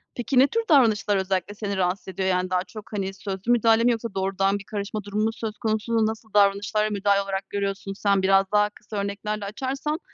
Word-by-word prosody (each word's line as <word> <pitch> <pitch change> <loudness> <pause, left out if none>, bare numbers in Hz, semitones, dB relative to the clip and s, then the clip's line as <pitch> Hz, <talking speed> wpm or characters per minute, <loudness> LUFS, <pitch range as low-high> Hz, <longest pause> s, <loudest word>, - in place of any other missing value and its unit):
Peki, 250 +1 +1
ne 270 - +7
tür 460 +8 -1
davranışlar 220 -8 +4
özellikle 190 +1 -1
seni 200 -2 -3
rahatsız 185 +2 -1
ediyor? 190 0 -2
Yani, 185 0 0
daha 180 0 +1
çok, 210 +4 -12
hani, 195 -2 -2
sözlü 195 +3 -3
müdahale 225 -1 +4
mi 245 - +4
yoksa 230 -2 -3
doğrudan 195 +1 0
bir - - -10
karışma 205 0 -4
durumu 205 +1 -2
mu 225 - +2
söz 220 -2 -5
konusu? 220 +1 0
Nasıl 220 0 -6
davranışlara, 205 +1 +3
müdahale 200 -1 +2
olarak 195 0 -4
görüyorsun 195 0 -3
sen? 200 -1 +1
Biraz 195 +1 +4
daha 210 0 +3
kısa 210 0 -9
örneklerle 200 +1 -3
açarsan, 275 +8 -3
205 Hz, 200 wpm, -24 LUFS, 195-220 Hz, -, ne